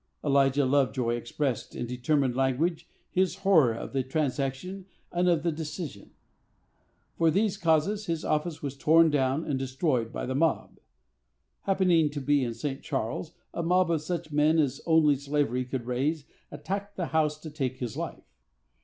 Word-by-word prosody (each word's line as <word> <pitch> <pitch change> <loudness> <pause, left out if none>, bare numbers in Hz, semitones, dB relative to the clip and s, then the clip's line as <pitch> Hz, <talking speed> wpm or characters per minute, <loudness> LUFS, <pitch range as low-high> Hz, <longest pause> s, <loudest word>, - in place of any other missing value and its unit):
Elijah 140 -1 +3
Lovejoy 130 -3 +1
expressed, 120 +2 -3
in - - -3
determined 125 +1 0
language, 135 +6 0 0.2
his 185 0 +1
horror 160 -11 +6
of - - -7
the 135 - +1
transaction 140 +7 -2 0.2
and 180 +1 +2
of 165 -3 +2
the 170 - +1
decision. 155 - -6 1.1
For 165 -1 +5
these 200 +5 +1
causes, 195 +4 +1
his 165 -2 -2
office 155 +1 -1
was 140 -1 -3
torn 160 +3 +5
down 140 +2 +1
and 140 -3 -1
destroyed 130 -3 -1
by - - -4
the 130 - -2
mob. 160 +4 0 0.9
Happening 180 -5 +3
to 145 0 -5
be 140 0 +2
in 120 -2 -3
St. 140 0 -4
Charles, 135 +4 -3 0.2
a - - -2
mob 180 +1 +2
of 160 -3 +1
such 165 0 -4
men 150 +2 +3
as 145 -5 +1
only 155 -3 +5
slavery 140 -3 -1
could 125 -1 -4
raise 140 +5 -1 0.2
attacked 200 +1 -5
the 180 - -2
house 150 -1 +2
to 155 0 -9
take 130 -4 -3
his 120 -4 -4
life. - - -5
150 Hz, 160 wpm, -28 LUFS, 130-165 Hz, 1.1 s, horror